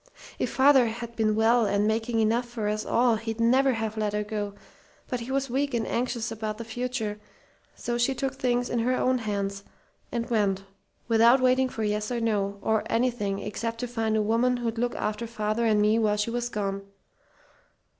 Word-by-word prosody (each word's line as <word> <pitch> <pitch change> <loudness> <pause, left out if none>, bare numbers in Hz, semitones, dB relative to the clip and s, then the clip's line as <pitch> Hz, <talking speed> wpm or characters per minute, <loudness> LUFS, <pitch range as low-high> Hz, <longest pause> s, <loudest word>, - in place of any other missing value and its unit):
"If - - 0
father'd 265 -4 +4 0.2
been 215 -2 +1
well 225 +1 +4
and 205 +1 +1
making 225 +1 0
enough 235 +3 +1
for 225 -3 -3
us 215 0 -1
all 240 -2 +3
he'd 225 0 -5
never 260 +3 +4
have 220 -1 -3
let 210 -1 -1
her 210 0 0
go, 205 -1 -4 0.5
but 250 - -2
he 235 +3 -6
was 275 0 0
weak 275 +1 -1
and 230 - 0
anxious 235 -2 -2
about 215 -1 -4
the 230 - -6
future, 225 -2 -3 0.6
so 240 0 -3
she 265 +3 +2
took 270 -1 -2
things 245 -1 0
into 235 -1 -1
her 255 +1 +2
own 255 0 +2
hands 200 -2 -3 0.5
and 235 -1 -2
went, 200 -4 +1 0.4
without 230 +3 +5
waiting 255 0 +3
for 225 - -4
yes 210 +1 -1
or 240 - -1
no, 205 -3 0
or 220 -1 +2
anything 230 -5 0
except 230 +2 -4
to 245 - -2
find 225 -2 0
a 215 - +2
woman 235 +4 +2
who'd 230 -1 -3
look 245 0 0
after 215 +2 -2
father 220 0 -1
and 215 -1 +3
me 215 +2 +3
while 210 -2 +2
she 210 +2 -1
was 240 0 -2
gone. 200 -3 -2
225 Hz, 195 wpm, -27 LUFS, 215-245 Hz, 0.6 s, without